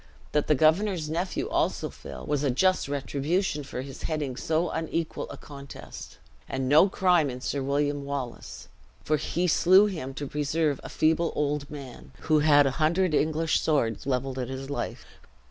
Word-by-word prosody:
That 150 - +1
the 150 - +4
governor's 160 +2 +2
nephew 175 +3 -2
also - - 0
fell, 65 - -9
was 145 -2 0
a 140 - +2
just 185 +9 +2
retribution 145 +4 -1
for 130 -2 -5
his 135 0 -9
heading 150 -5 -2
so 160 +6 0
unequal 165 0 -3
a - - -8
contest, 140 -1 -10 0.3
and 135 -1 -2
no 150 +8 +6
crime 180 -6 +3
in 125 0 -6
Sir 135 +2 -2
William 145 +1 0
Wallace; 140 -4 -6 0.4
for 155 - +1
he 175 +4 -1
slew 185 +4 +6
him 155 -10 -4
to 145 - -4
preserve 150 0 0
a - - -7
feeble 160 +1 +2
old 145 -1 -1
man, 125 - -10
who 155 -1 +3
had 145 -1 +5
a 135 - +2
hundred 170 +2 +2
English 155 +1 +1
swords 135 -6 0
leveled 130 0 -1
at 125 - -3
his 135 +1 -6
life." - - -4
150 Hz, 170 wpm, -27 LUFS, 135-160 Hz, 0.4 s, no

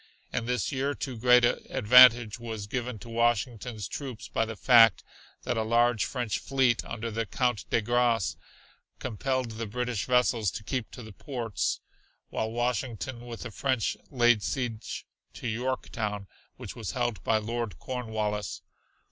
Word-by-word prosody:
In 120 -2 -2
this 125 +4 0
year 140 +1 -1
too 130 - -4
a - - -8
great 125 +1 +6
advantage 120 -2 +6
was 110 -3 -5
given 125 +2 -3
to 120 - -12
Washington's 115 -2 -1
troops 130 -6 -6
by 115 - 0
the 110 0 -6
fact 115 -2 +6 0.4
that - - -1
a - - +2
large 115 0 +2
French 120 -5 -2
fleet 130 -3 +1
under 115 0 -5
the 115 0 -2
Count 125 0 -1
de 115 - +2
Grasse 120 -3 +2 0.6
compelled 130 +1 -2
the 110 0 -5
British 125 -1 -2
vessels 125 -4 +2
to 105 - -7
keep 125 +1 -3
to 125 - -10
the 110 -1 -11
ports, 120 -4 -3 0.5
while 110 - -1
Washington 120 +1 -2
with 115 -1 -7
the 115 - -6
French 130 -1 0
laid 120 -4 +4
siege 120 -3 -3 0.3
to - - -5
Yorktown, 110 -3 -3 0.3
which - - -8
was 110 -7 -5
held 120 -8 -2
by 110 - +3
Lord 115 0 -3
Cornwallis. 110 -4 -3
120 Hz, 155 wpm, -28 LUFS, 110-125 Hz, 0.6 s, great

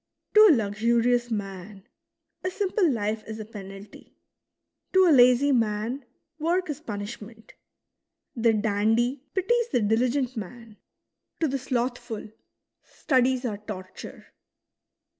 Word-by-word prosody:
To 430 0 +8
a 315 - +7
luxurious 235 +3 +1
man, 195 -1 -6 0.6
a 370 - 0
simple 380 -1 +1
life 215 -3 -2
is 220 0 -7
a 215 - -6
penalty; 195 -1 -12 0.8
to 375 0 +6
a 345 - +5
lazy 255 +1 +5
man, 230 +2 -1 0.3
work 345 +2 0
is 290 - -7
pun 210 -9 -5
ishment; 220 +1 -10 0.8
the 230 -1 +3
dandy 220 +4 +1
pities 470 +5 +1
the - - +2
diligent 245 +4 +1
man; 220 +1 -9 0.6
to 320 - +2
the 275 0 -2
slothful, 240 -4 -3 0.5
studies 260 -2 0
are 210 -4 -3
torture. 195 -3 -10
235 Hz, 120 wpm, -26 LUFS, 210-265 Hz, 0.8 s, To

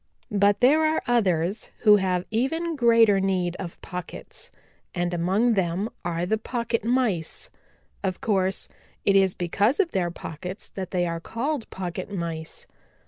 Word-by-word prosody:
"But 200 0 +3
there 295 +6 +5
are 315 0 +1
others 200 -5 +1
who 210 -2 +7
have 185 -2 0
even 320 +9 0
greater 230 -6 +5
need 185 -2 0
of 175 -3 -7
pockets, 180 -1 -7 0.5
and 175 0 -1
among 190 +8 +2
them 190 +2 0
are 170 0 -1
the 220 +4 0
Pocket 235 -1 -2
Mice. 225 -9 0 0.5
Of 185 -2 -1
course, 190 -3 0 0.4
it 200 - +4
is 190 -2 +4
because 200 - +1
of 365 -4 +2
their 180 -3 0
pockets 180 +3 -7
that 190 -2 -6
they 180 -2 0
are 170 -1 -2
called 245 - -3
Pocket 185 0 -5
Mice. 165 -4 -5
195 Hz, 145 wpm, -25 LUFS, 175-230 Hz, 0.5 s, who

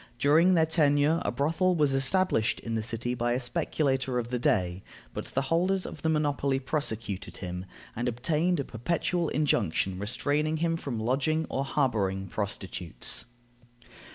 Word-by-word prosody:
During 160 +8 +5
their 160 -1 +4
tenure, 155 0 +3
a - - 0
brothel 165 +6 +1
was 150 -4 +2
established 135 - +2
in 115 - -4
the 110 - 0
city 115 +2 -3
by 120 0 0
a 125 - 0
speculator 130 -2 0
of 120 -1 -2
the 125 0 -1
day, 95 - +1 0.3
but - - -4
the 135 - -1
holders 180 +6 +1
of 155 - -7
the 160 - +1
monopoly 145 -3 +1
prosecuted 115 -8 -3
him, 90 0 -5 0.3
and 120 +2 -1
obtained 155 +8 0
a - - 0
perpetual 165 +7 -1
injunction 100 - +1
restraining 145 +9 0
him 165 +1 +1
from 135 -8 -4
lodging 145 +8 +1
or 135 - 0
harboring 105 -9 0
prostitutes. 95 - -2
135 Hz, 155 wpm, -28 LUFS, 115-155 Hz, 0.3 s, During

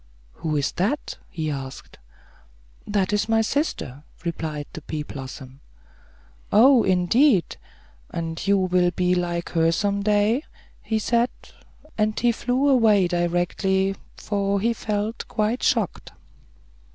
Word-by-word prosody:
"Who 155 - -3
is 140 - 0
that?" 225 +12 -1
he 160 -4 -3
asked. 135 -1 -8 0.9
"That 205 -1 0
is 210 +1 0
my 225 0 +4
sister," 220 - -2 0.2
replied 155 -3 -3
the 160 - -7
pea 150 0 -4
blossom. 135 -1 -9 0.9
"Oh, 250 +3 +7
indeed; 190 - +3 0.5
and 165 +2 -4
you 200 0 +4
will 180 -1 +2
be 180 0 +1
like 175 -1 -1
her 165 -1 +3
some 200 +3 0
day," 210 +4 +2 0.6
said 235 +3 +1
he; - - -17 0.5
and 215 0 +1
he 240 0 +3
flew 250 +4 0
away 220 -8 +4
directly, 180 +2 0 0.2
for 200 -1 -1
he 230 +4 +1
felt 215 0 -3
quite 220 +2 -1
shocked. 225 -7 0
195 Hz, 125 wpm, -24 LUFS, 170-220 Hz, 0.9 s, Oh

